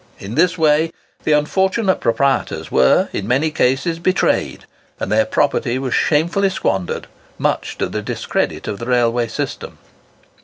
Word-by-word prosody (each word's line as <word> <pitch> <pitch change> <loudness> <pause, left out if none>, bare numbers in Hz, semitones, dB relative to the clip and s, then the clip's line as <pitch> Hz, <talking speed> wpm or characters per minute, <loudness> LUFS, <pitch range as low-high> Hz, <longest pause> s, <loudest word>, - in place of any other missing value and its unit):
In 100 +3 -8
this 170 +6 +2
way 160 0 +3 0.3
the 155 - +3
unfortunate 190 +6 +1
proprietors 130 +4 0
were, 65 - +4
in 100 - -3
many 140 +6 +1
cases, 150 +5 0
betrayed, 185 +3 0 0.3
and - - -3
their 110 +1 +3
property 130 -1 +1
was 130 -2 -2
shamefully 170 +6 +2
squandered, 95 - -2 0.3
much - - -1
to - - -1
the - - -4
discredit - - -2
of 100 - -4
the 115 - -6
railway 120 -1 +2
system. - - -5
140 Hz, 145 wpm, -19 LUFS, 115-165 Hz, 0.3 s, were